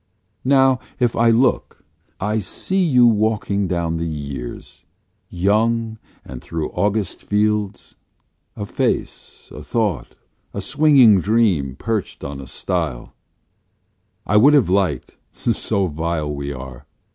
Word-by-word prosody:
Now, 135 -1 +4 0.2
if 120 -2 +1
I 115 0 +3
look, 120 +3 +1 0.4
I 105 +3 -1
see 185 - -2
you 125 -8 +4
walking 105 -3 +1
down 85 -2 -1
the 85 0 -3
years, 70 -5 -7 0.5
Young, 110 +4 0 0.3
and 65 -2 -9
through 80 -2 -4
August 105 -2 -1
fields 105 -1 -1 0.6
a 105 - -5
face, - - -3
a - - -8
thought, 105 -8 -2 0.4
a - - -2
swinging 135 -10 +5
dream 95 - +1
perched 110 +5 -3
on 70 -1 -6
a 65 - -10
stile; - - -3 1.1
I 105 - +2
would 140 +7 +6
have 120 -11 +3
liked 90 -9 -1
(so 105 -3 -1
vile 80 -2 -3
we 70 0 -4
are!) 65 0 -9
100 Hz, 120 wpm, -20 LUFS, 80-115 Hz, 1.1 s, would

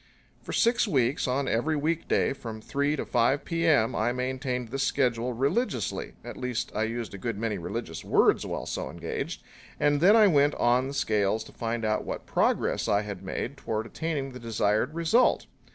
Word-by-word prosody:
For - - -8
six 235 0 +3
weeks, 135 - +1
on 130 +2 0
every 140 +8 +1
week 155 +3 -1
day - - +2
from 115 -5 -7
three 140 +6 -1
to - - -3
five 120 +4 +1
P.M. 160 -8 +2
I 110 +3 +1
maintained 125 -1 -3
this 135 +3 -3
schedule 125 -3 +1
religiously 135 - -1
at - - -8
least 125 -3 -3
I 110 +1 0
used 115 -1 -4
a 100 - -7
good 115 +1 -3
many 105 -2 -2
religious 85 -1 -5
words - - +3
while - - -4
so - - -4
engaged 85 0 -5 0.4
and 145 0 +2
then 195 +5 +7
I 220 -2 +7
went 145 -5 +4
on 125 +2 +2
the 140 - -6
scales 110 -4 +1
to - - -14
find 115 -1 -3
out 110 0 0
what - - -5
progress - - +1
I 105 -1 +2
had 100 -3 -6
made 120 +8 -4
toward 110 -4 -3
attaining 145 0 -3
the 125 - -9
desired 115 +4 0
result. 170 +10 +3
125 Hz, 185 wpm, -27 LUFS, 110-145 Hz, 0.4 s, then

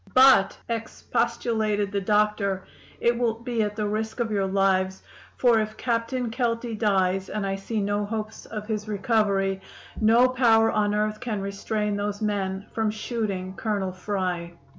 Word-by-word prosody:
"'But,' 260 -6 +6
expostulated 225 -2 -1
the 200 -1 -1
doctor, 205 -1 +1 0.4
'it 235 0 +3
will 235 -2 +1
be 235 0 -2
at 210 -1 -1
the 210 -1 -1
risk 220 +2 -3
of 230 -2 0
your 200 -2 +1
lives; 190 -1 +1 0.3
for 240 -3 +4
if 215 0 -3
Captain 235 0 -1
Kelty 230 -1 -1
dies 190 -3 +1
and 210 -2 -2
I 195 0 -1
see 205 +3 -3
no 205 +1 0
hopes 215 0 -5
of 210 -1 -6
his 215 -1 -3
recovery 200 -2 +1 0.4
no 230 +3 +6
power 230 -3 +4
on 210 -1 +1
earth 215 0 0
can 230 -5 -3
restrain 205 +1 -2
those 205 0 -2
men 200 -2 -2
from 220 -1 +1
shooting 210 -4 -3
Colonel 200 -2 -2
Fry. 180 -2 -3
210 Hz, 155 wpm, -25 LUFS, 195-225 Hz, 0.4 s, But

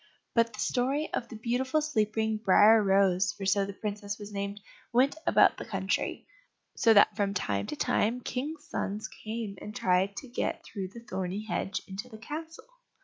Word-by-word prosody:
But 230 -1 +3
the 210 - -10
story 265 +7 0
of 235 - -2
the 230 - -8
beautiful 250 +6 0
sleeping 220 -7 0
"Briar 215 +1 +6
rose," 195 -2 +3
for 195 +1 -6
so 195 +1 +2
the 200 - -6
princess 205 0 -4
was 205 0 -9
named, 200 0 -3 0.3
went 255 +4 +3
about - - +5
the - - -5
country, - - -2 0.5
so 230 - +4
that 205 - +6
from 200 -1 0
time 100 - -1
to - - -4
time 225 +10 +1
kings' 295 +6 -4
sons 210 +2 -3
came 220 -2 -6
and 210 - -8
tried 185 +2 +2
to 270 - -6
get 240 - -2
through 195 -3 -5
the 230 +5 -11
thorny 190 +3 -3
hedge 195 -2 -2
into 195 +6 -7
the 220 - -10
castle. 320 - -7
215 Hz, 180 wpm, -29 LUFS, 200-240 Hz, 0.5 s, Briar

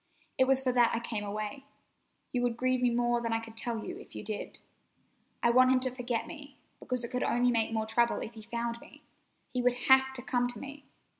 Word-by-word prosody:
It 260 - +6
was 265 0 +3
for 255 - +2
that 240 -2 +4
I - - 0
came 225 -3 -3
away. 210 +6 -4 0.7
You 250 - 0
would 240 -1 0
grieve 255 0 +1
me 250 - +4
more 240 0 +1
than 230 -1 -2
I 225 - +1
can 225 0 -10
tell 225 0 -3
you - - -6
if - - -13
you - - -6
did. 215 -1 -5 0.9
I 235 - +5
want 255 +1 +6
him 260 - +4
to 255 -1 0
forget 245 -2 -2
me, 290 -3 -11 0.2
because 250 -1 -3
it 235 - -5
could 250 - -1
only 245 +1 +2
make 225 -2 +1
him 220 -1 -1
trouble 235 +2 +2
if 230 - -6
he 220 - -10
found 235 +1 -4
me. - - -16 0.5
He 250 - -1
would 245 0 +2
have 265 0 +7
to 250 -2 -8
come 245 -2 +1
to 245 - -7
me. 280 0 -9
245 Hz, 235 wpm, -31 LUFS, 230-255 Hz, 0.9 s, have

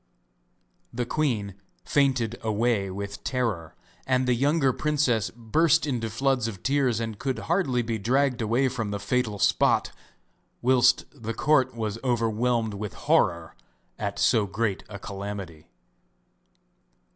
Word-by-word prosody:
The 120 0 -2
queen 115 -9 -1 0.3
fainted 130 -5 +1
away 110 -2 0
with 100 +1 -6
terror, 115 - -2 0.3
and 130 -1 +2
the 125 - +4
younger 135 +2 +2
princess 140 -8 +1
burst 155 +8 +2
into 120 -6 -2
floods 125 +1 0
of 95 -5 -7
tears 135 -4 +1
and 110 -3 -4
could 130 0 -2
hardly 155 -9 0
be 115 -1 -3
dragged 125 +3 +1
away 120 +5 +2
from 120 -4 -3
the 100 0 -3
fatal 105 +1 -1
spot, - - +2 0.7
whilst 125 0 +4
the 115 0 -6
court 135 -4 +2
was 110 -1 -3
overwhelmed 115 -2 0
with 100 0 -5
horror 85 -2 +1 0.4
at - - -3
so 105 -3 +3
great 105 0 -2
a 100 - -7
calamity. 100 -5 -7
115 Hz, 130 wpm, -26 LUFS, 105-130 Hz, 0.7 s, the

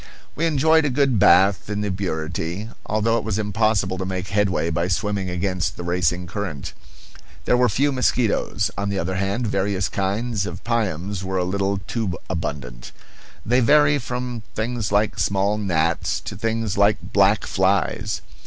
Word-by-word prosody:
We 165 +2 +1
enjoyed 160 +1 +4
a 145 - +1
good 135 -4 +2
bath 95 -2 +5
in 105 0 -2
the 105 -1 -1
Burity, 90 +2 -3 0.2
although 115 +2 +1
it - - -6
was 110 -3 -2
impossible 105 -3 0
to - - -1
make 95 0 -4
headway 100 -4 +1
by 85 +2 0
swimming 100 +1 -1
against 90 0 -2
the 90 - -5
racing 90 0 0
current. 85 -6 -5 0.7
There - - +3
were 125 0 +3
few 140 +7 +1
mosquitoes. 115 -4 +1
On 100 0 -1
the 100 - -2
other 95 +2 -2
hand, 100 +5 -1
various 100 -1 0
kinds 100 +2 -1
of - - -7
piums 100 -5 -1
were 95 0 -3
a 90 - +1
little 100 +2 0
too 95 -2 -2
abundant; 70 -8 -5 0.5
they 120 +4 +3
vary 145 +3 +4
from 125 -1 -4
things 115 -2 -2
like 105 +1 +1
small 100 +2 +1
gnats 85 -4 0
to - - -7
things 115 -3 -2
like 100 +1 +2
black 100 +1 +4
flies. 100 +2 0
100 Hz, 160 wpm, -22 LUFS, 95-115 Hz, 0.7 s, bath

